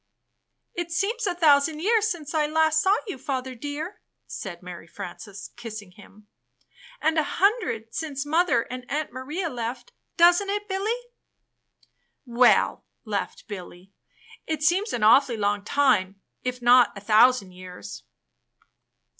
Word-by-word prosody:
"It 345 -1 -4
seems 410 +7 -1
a 355 - -1
thousand 305 -2 +4
years 435 +4 +2
since 335 -8 -4
I 305 -2 +2
last 315 0 +2
saw 385 +4 +4
you, 390 - -6
Father 260 -1 -3
dear," 295 - -6 0.2
said 180 -3 -7
Mary 175 -2 -9
Frances, 195 +4 -9
kissing 220 -5 -8
him, 205 +2 -18 0.8
''and 315 +1 +3
a - - +2
hundred 385 - +1
since 290 -3 -4
Mother 315 -6 +2
and 250 0 -9
Aunt 300 -1 -3
Maria 295 +8 -4
left; 245 -3 -5 0.3
doesn't 350 +3 +5
it, 415 +1 -2
BiUy?" 390 +2 -1 1.4
"WeU," 240 +1 +3 0.2
laughed 205 -2 -4
Billy, 185 -2 -10 0.5
"it 310 -2 -2
seems 375 +7 +2
an 230 - -2
a\\^ully 235 +2 +5
long 205 -1 0
time, 200 -7 +1 0.2
if 250 -1 -4
not 245 -3 +5
a - - -8
thousand 220 -1 +4
years." 180 - -10
270 Hz, 135 wpm, -25 LUFS, 215-335 Hz, 1.4 s, doesn't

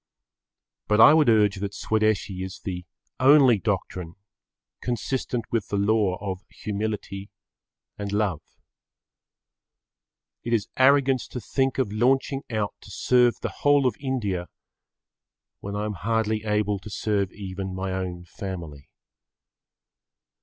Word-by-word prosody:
But 105 0 +2
I 130 - +9
would 155 -5 +5
urge 105 -3 +4
that 100 +1 -4
Swadeshi[Pg 110 -3 0
18] 95 - -3
is 95 -1 -7
the 90 -2 -5 0.3
only 130 -4 +6
doctrine 95 -4 -3 0.7
consistent 125 0 -2
with 115 -4 0
the 100 - -2
law 100 -2 +2
of 95 -2 -4
humility 105 -1 -4 0.7
and 100 -1 -4
love. 100 -6 0 2.0
It 120 - -2
is 110 -3 0
arrogance 135 -1 +4
to 125 - -6
think 135 +2 -1
of 130 -6 0
launching 135 +4 +2
out 110 -3 -1
to - - -14
serve 125 -1 +2
the - - -4
whole 145 -1 +4
of 125 -5 +2
India 105 -10 -2 1.1
when 100 0 -6
I 105 +1 -2
am 105 - -2
hardly 110 +3 -1
able 105 -1 0
to 100 - -10
serve 100 -2 -1
even 95 -1 -6
my 95 0 -3
own 90 -2 -4
family. 85 -7 -7
105 Hz, 130 wpm, -25 LUFS, 95-120 Hz, 2.0 s, I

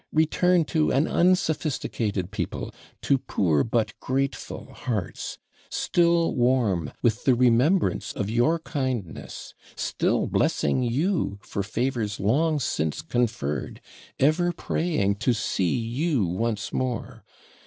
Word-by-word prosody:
Return 165 +2 +3
to 155 -1 +1
an 140 +5 +2
unsophisticated 150 - 0
people 105 - -4 0.3
to 135 -2 +3
poor, 80 - +1
but 115 -2 0
grateful 135 +1 -3
hearts, 105 -9 -4 0.3
still 170 -1 +2
warm 120 - +1
with 115 0 +1
the 130 - +4
remembrance 125 +9 +3
of 100 - -3
your 120 +10 +2
kindness, 130 - -4 0.2
still - - 0
blessing 75 - +1
you 130 - 0
for 100 - -3
favours 110 0 -2
long 150 +10 +2
since 110 - -1
conferred, 115 - -2 0.4
ever 165 +5 +3
praying 155 - 0
to 125 - +2
see 95 -2 0
you 120 - 0
once 105 +4 -2
more. 125 -3 -3
125 Hz, 110 wpm, -25 LUFS, 105-155 Hz, 0.4 s, the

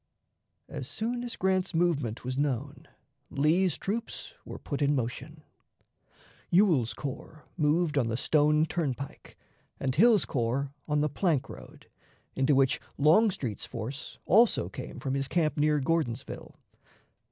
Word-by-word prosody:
As - - -6
soon 240 +2 -3
as 240 -1 -5
Grant's 185 -1 0
movement 145 -10 0
was 130 0 -2
known, 140 0 -2 0.4
Lee's 160 +4 +2
troops 225 - -4
were - - -8
put 145 0 -5
in 145 0 +3
motion. 140 +5 -4 1.1
Swell's 170 - +3
corps 150 +2 -7
moved 155 -1 +2
on 120 - +1
the 115 0 -1
Stone 150 +3 +3
Turnpike, 140 -5 -4 0.4
and 130 -1 -1
Hill's 215 - +5
corps 135 +2 -1
on 150 -1 +1
the 150 - +2
plank 155 -1 0
road, - - -12 0.5
into 135 +1 +2
which 135 -1 +3 0.2
Longstreet's 155 - +2
force 135 +7 -6
also 225 +5 +4
came - - -8
from 135 -2 -3
his 135 0 -1
camp 155 -1 +1
near 150 -1 +2
Gordonsville. 140 -3 -2
150 Hz, 130 wpm, -29 LUFS, 135-175 Hz, 1.1 s, Hill's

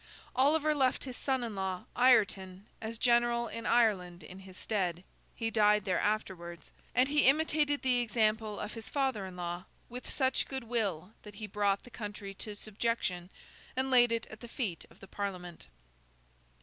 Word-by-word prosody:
Oliver 305 +3 +4
left 265 -3 +1
his 255 -2 -6
son 265 -2 0
in 230 -2 -4
law, 190 -1 -2
Ireton, 200 -6 +3 0.2
as 225 +1 -5
general 235 0 +3
in 230 +1 -5
Ireland 185 -8 +2
in 180 +5 -10
his 190 -1 -12
stead 185 -5 -1 0.3
(he 225 -1 -2
died 210 -2 +4
there 185 -2 +1
afterwards), 175 -6 -3 0.2
and 255 +1 +5
he 290 -2 +3
imitated 295 0 +3
the 250 -2 +3
example 220 -2 +1
of 210 0 -5
his 225 -1 -8
father 265 -9 0
in 185 - -9
law 175 0 -4 0.2
with 250 +1 -7
such 260 -2 +1
good 265 -2 -4
will 205 -7 -1
that 210 -1 -12
he 215 - -5
brought 200 -1 0
the 245 - -14
country 205 -3 -6
to 210 +2 -6
subjection, 205 -4 -2 0.5
and 265 +1 0
laid 240 -2 +6
it 230 -1 0
at 215 - -10
the 240 - -9
feet 215 - -3
of - - -21
the 195 - -11
Parliament. 180 - -5
215 Hz, 175 wpm, -32 LUFS, 190-245 Hz, 0.5 s, laid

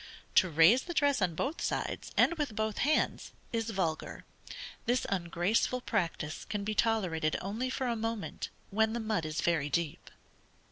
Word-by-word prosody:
To 185 - +5
raise 165 - +6
the 345 +3 -6
dress 285 -5 +3
on 175 -3 +1
both 280 - -2
sides, - - -2
and - - +5
with 295 -9 -3
both 220 -1 -1
hands, 300 +3 +1 0.2
is 225 -1 -1
vulgar. 180 -7 -2 0.6
This 245 +2 +2
ungraceful 185 +7 0
practice 170 -9 -2
can 210 -2 -3
be 215 +1 -1
tolerated 185 -9 +1
only 220 +7 -3
for 260 0 -2
a 240 -2 0
moment, 225 -1 -3 0.2
when 220 +2 +2
the 235 - -1
mud 215 -8 -1
is 155 +1 -2
very 160 -4 +1
deep. 165 -1 -2
215 Hz, 160 wpm, -31 LUFS, 170-235 Hz, 0.6 s, raise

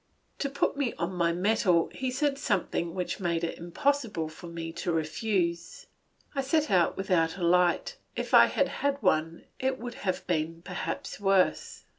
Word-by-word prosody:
To 280 - -1
put 280 - 0
me 280 -4 -1
on 170 +2 -3
my 170 -2 +2
mettle 180 -1 +2
he 260 -1 -2
said 275 +2 0
something 175 -4 -1
which 180 -1 -3
made 170 -3 -1
it 170 - -3
impossible 205 - -1
for 160 +2 -11
me 165 -1 -5
to 170 +1 -2
refuse. 170 +2 -1 0.5
I 275 - 0
set 300 +3 +1
out 180 -3 +3
without 180 -3 +1
a 180 - -4
light; 180 - +2 0.2
if - - -4
I - - +9
had - - +1
had 280 0 -1
one, 165 -2 +1 0.2
it 260 0 0
would 245 -1 -6
perhaps 185 -5 -2
have - - -17
been 165 +2 -2
even 180 - -3 0.2
worse. 195 -1 +2
180 Hz, 175 wpm, -28 LUFS, 170-250 Hz, 0.5 s, I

